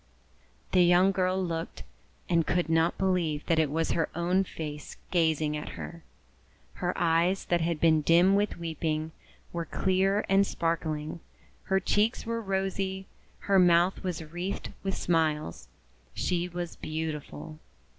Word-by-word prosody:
The 185 - +5
young 180 +2 +5
girl 185 0 0
looked, 165 -3 -4 0.4
and 165 -2 +2
could 175 -2 0
not 165 +1 +2
believe 175 -6 0
that 165 -1 +2
it 155 -3 +2
was 160 +3 0
her 165 - 0
own 180 +3 +2
face 150 -4 -7
gazing 160 -3 +2
at 150 - -6
her. 170 -1 -8 0.8
Her 180 0 +1
eyes, 170 +3 +2
that 175 -1 +1
had 165 -1 -1
been 160 -1 +4
dim 175 +5 +5
with 205 -1 +1
weeping, 160 -1 -2 0.4
were 170 -1 -2
clear 195 +3 +1
and 195 +1 +4
sparkling, 160 -1 -2 0.5
her 190 0 +2
cheeks 205 +4 +1
were 230 0 -2
rosy, 190 -1 -2 0.4
her 195 -1 +3
mouth 175 +2 +4
was 175 -3 -3
wreathed 175 +5 -5
with 195 0 -2
smiles. 155 - 0 0.5
She 175 -1 0
was 175 -1 -5
beautiful. 155 0 -5
170 Hz, 140 wpm, -28 LUFS, 160-190 Hz, 0.8 s, The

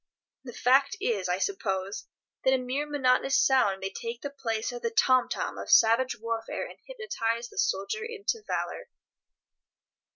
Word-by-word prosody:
The 245 - -8
fact 270 +4 +3
is, 200 -6 -1
I 180 - +1
suppose, 195 - -2 0.4
that 265 0 +4
a - - +2
mere 260 +4 -2
monotonous 270 -1 +2
sound 205 -8 +3
may 195 0 -3
take 230 +3 -6
the 285 - -4
place 225 -5 -3
of 245 0 -7
the 230 - 0
tom 255 +2 +3
tom - - -3
of - - -7
savage 230 +2 +4
warfare, 230 0 -3
and - - -12
hypnotize 235 - -3
the - - -7
soldier 200 - 0
into 455 -1 -3
valour. - - -3
245 Hz, 160 wpm, -28 LUFS, 225-275 Hz, 0.4 s, that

